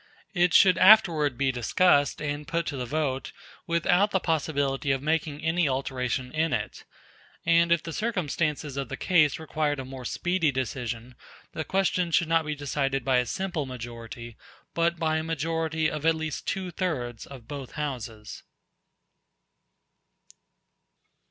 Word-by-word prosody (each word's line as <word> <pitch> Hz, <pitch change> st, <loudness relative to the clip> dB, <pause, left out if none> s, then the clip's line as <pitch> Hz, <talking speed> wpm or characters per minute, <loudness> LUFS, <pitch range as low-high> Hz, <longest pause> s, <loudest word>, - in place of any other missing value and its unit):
It 175 Hz, -2 st, +3 dB
should 185 Hz, -2 st, +6 dB
afterward 170 Hz, -, +6 dB
be 135 Hz, -1 st, +2 dB
discussed 145 Hz, +5 st, +2 dB
and 145 Hz, 0 st, -3 dB
put 170 Hz, 0 st, -1 dB
to 145 Hz, -, -3 dB
the 125 Hz, -2 st, -4 dB
vote 140 Hz, -1 st, -2 dB, 0.4 s
without 175 Hz, +4 st, +3 dB
the 190 Hz, -, +1 dB
possibility 145 Hz, -4 st, 0 dB
of 135 Hz, -, +1 dB
making 155 Hz, -1 st, -1 dB
any 165 Hz, -1 st, +2 dB
alteration 130 Hz, -1 st, -2 dB
in 160 Hz, +1 st, 0 dB
it; -, -, -4 dB, 0.6 s
and 170 Hz, 0 st, +4 dB
if 170 Hz, -2 st, +3 dB
the 165 Hz, -, -6 dB
circumstances 155 Hz, -, -2 dB
of 140 Hz, -, -3 dB
the -, -, -5 dB
case 155 Hz, -6 st, +3 dB
required 155 Hz, -2 st, -2 dB
a 130 Hz, -, -5 dB
more 130 Hz, 0 st, -8 dB
speedy 175 Hz, +4 st, 0 dB
decision, 125 Hz, -2 st, -4 dB, 0.4 s
the 160 Hz, -, -4 dB
question 185 Hz, -1 st, 0 dB
should 170 Hz, 0 st, +2 dB
not 165 Hz, -1 st, +2 dB
be 150 Hz, -, -2 dB
decided 135 Hz, -2 st, -2 dB
by 130 Hz, -2 st, +3 dB
a 125 Hz, -1 st, +1 dB
simple 180 Hz, -, -3 dB
majority, 120 Hz, -1 st, -8 dB, 0.4 s
but 170 Hz, 0 st, +1 dB
by 160 Hz, -1 st, 0 dB
a 160 Hz, -, -2 dB
majority 160 Hz, 0 st, -1 dB
of 155 Hz, -1 st, -4 dB
at 165 Hz, 0 st, +4 dB
least 160 Hz, -2 st, -5 dB
two 190 Hz, -2 st, -2 dB
thirds 130 Hz, -11 st, -3 dB
of 130 Hz, -5 st, -12 dB
both 140 Hz, -3 st, -7 dB
houses." 120 Hz, -8 st, -5 dB
150 Hz, 150 wpm, -27 LUFS, 135-165 Hz, 0.6 s, should